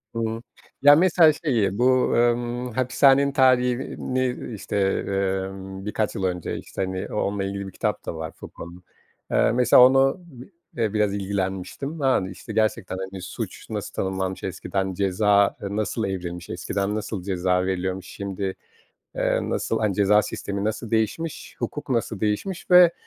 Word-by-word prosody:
Iıı. 115 0 -2 0.4
Ya, 145 +1 +8
mesela, 165 -1 +5
şeyi, 115 - 0
bu, 130 +1 +3
emm, 120 +1 +1
hapishanenin 135 +3 +4
tarihini, 130 -1 +1
işte, 105 - -4 0.3
emm, 95 0 -3
birkaç 105 0 -1
yıl 95 - -3
önce, 90 -2 -2
işte, - - -7
hani, 95 0 -4
o - - -3
onunla 100 -1 -1
ilgili 100 0 -4
bir - - -8
kitap - - -2
da - - -4
var 80 0 -5
Foucault'nun. 85 +2 -11 0.5
Eee, - - +3
mesela 125 +1 +6
onu, 135 +3 +4
bi 130 -1 -13 0.3
eee, 110 -3 0
biraz 105 -2 +1
ilgilenmiştim. 100 - -3
Yani 130 -9 +2
işte, 105 +4 -9
gerçekten. 105 -4 0
Hani, 95 0 -6
suç 90 - -7
nasıl - - -5
tanımlanmış, 95 0 -3
eskiden 95 +1 -3
ceza 100 +2 +2
nasıl 105 +2 -2
evrilmiş, 90 -2 -5
eskiden 100 +1 -2
nasıl 105 -3 -4
ceza 90 -1 0
veriliyormuş, 95 0 -2
şimdi, 100 -1 -4 0.6
eee, - - +1
nasıl, 115 - -1
hani, 105 -2 +1
ceza 105 +1 +4
sistemi 100 -1 -4
nasıl 110 +2 -3
değişmiş, 115 +9 -2
hukuk 150 - -5
nasıl 115 -4 -1
değişmiş 110 - -2
ve, 180 -1 +8
105 Hz, 150 wpm, -24 LUFS, 95-125 Hz, 0.6 s, Ya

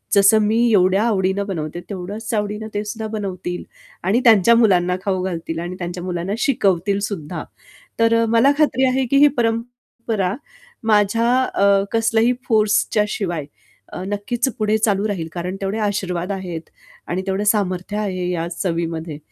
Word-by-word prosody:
जसं 200 +2 +6
मी 215 +2 +2
एवढ्या 190 +1 +4
आवडीनं 200 -2 +1
बनवते, 165 -3 -4
तेवढ्याच 200 +4 -5
आवडीनं 210 0 -2
ते 205 0 -2
सुद्धा 220 +1 -5
बनवतील. 180 -3 -4 0.4
आणि 205 +6 +2
त्यांच्या 230 0 +6
मुलांना 180 -6 +3
खाऊ 190 -2 0
घालतील 165 -3 -4
आणि 175 +2 -5
त्यांच्या 175 0 -5
मुलांना 180 +1 -3
शिकवतील 200 -6 +1
सुद्धा. 160 -7 -5 0.6
तर 230 0 +4
मला 230 +4 +4
खात्री 290 -4 +3
आहे 260 +1 +1
की 275 - +3
ही 290 +1 +7
परंपरा 230 -4 -2 0.6
माझ्या 215 +3 +3
अ, 200 -4 +3
कसल्याही 225 +1 +2 0.2
फोर्सच्या 215 -1 +2
शिवाय 175 -8 -3 0.6
नक्कीच 215 +6 -1
पुढे 215 0 +2
चालू 210 -1 +1
राहील, 170 -5 -3
कारण 180 +2 -4
तेवढे 195 +3 -2
आशीर्वाद 185 -2 -2
आहेत 180 -4 -6 0.4
आणि 185 +2 -2
तेवढं 195 +2 -1
सामर्थ्य 200 -2 0
आहे 185 -4 -2
या 170 -2 -2
चवीमध्ये. 165 -3 -3
200 Hz, 145 wpm, -20 LUFS, 180-220 Hz, 0.6 s, ही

